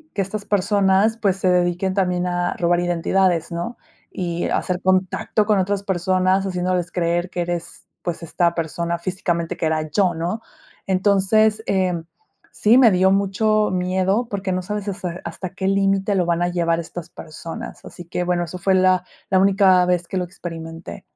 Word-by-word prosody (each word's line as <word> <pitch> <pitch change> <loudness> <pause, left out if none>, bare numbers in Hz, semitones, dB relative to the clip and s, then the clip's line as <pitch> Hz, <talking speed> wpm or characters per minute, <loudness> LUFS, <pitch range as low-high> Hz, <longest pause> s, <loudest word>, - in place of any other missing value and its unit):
que 195 - +1
estas 205 +2 -6
personas, 200 +1 +2
pues, 195 -3 +2
se 190 - -1
dediquen 180 +1 +1
también 180 -2 0
a 175 0 -1
robar 175 0 +2
identidades", 175 0 +1
¿no? 175 +8 -4 0.3
Y 175 -2 -3
hacer 180 0 -1
contacto 185 +3 +1
con 210 -2 +3
otras 200 +1 -1
personas, 185 0 +1
haciéndoles 180 -1 -1
creer 175 +1 0
que 175 - -3
eres, 175 0 -5 0.2
pues, 175 -1 -4
esta 170 +1 0
persona 170 +1 -2
físicamente 170 -2 -2
que 160 - 0
era 155 -1 -1
yo, 185 -3 +2
¿no? 175 +7 -3 0.5
Entonces, 205 +3 +3
em, 180 -4 0 0.5
sí 230 +5 +4
me 240 -4 +7
dio 190 0 +3
mucho 210 +2 +2
miedo, 185 +5 0
porque, 195 -2 -3
no 185 0 -1
sabes 210 +1 -4
ese 185 -3 -4
hasta 185 - -6
qué 190 0 -3
límite 195 0 +2
lo 180 -2 +2
van 170 0 0
a 175 - +2
llevar 170 -1 0
estas 170 0 -7
personas. 165 +1 -9
Así 175 - -10
que, 180 +1 -3
bueno, 175 -1 0
eso 180 +2 -7
fue 190 +2 +1
la 185 -1 +3 0.3
la 190 - +3
única 190 -2 +5
vez 180 -1 0
que 190 - -3
lo 180 - 0
experimenté. 165 -2 -8
185 Hz, 175 wpm, -21 LUFS, 175-195 Hz, 0.5 s, me